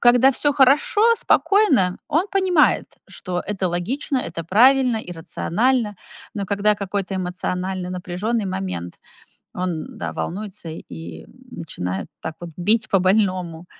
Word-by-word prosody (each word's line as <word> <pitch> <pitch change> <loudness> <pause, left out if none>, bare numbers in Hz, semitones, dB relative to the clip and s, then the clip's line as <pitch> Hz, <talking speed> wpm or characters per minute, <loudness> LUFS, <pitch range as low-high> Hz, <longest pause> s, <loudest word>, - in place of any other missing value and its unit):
когда 245 +2 +6
всё 290 +3 +2
хорошо, 285 - +4
спокойно, 285 - +3
он 325 +5 +2
понимает, 370 -5 +3 0.2
что 180 -1 -4
это 190 -3 -1
логично, 255 - -2
это 165 -7 -5
правильно 245 - +4
и 180 -4 -7
рационально. 210 +7 0 0.4
Но 200 -2 -3
когда 205 +2 +2
какой-то 200 -1 -3
эмоциональный 180 0 -3
напряженный 185 +5 -2
момент, 90 - -5 0.6
он, 180 +1 -2
да, - - -3
волнуется 190 -2 -5
и, 80 - -9
м, - - -19 0.2
начинает 90 +1 -5
так 160 - -5
вот 175 -1 -7
бить 215 +6 +2
по 195 - +4
больному. 185 -3 +1
195 Hz, 130 wpm, -22 LUFS, 175-245 Hz, 0.6 s, когда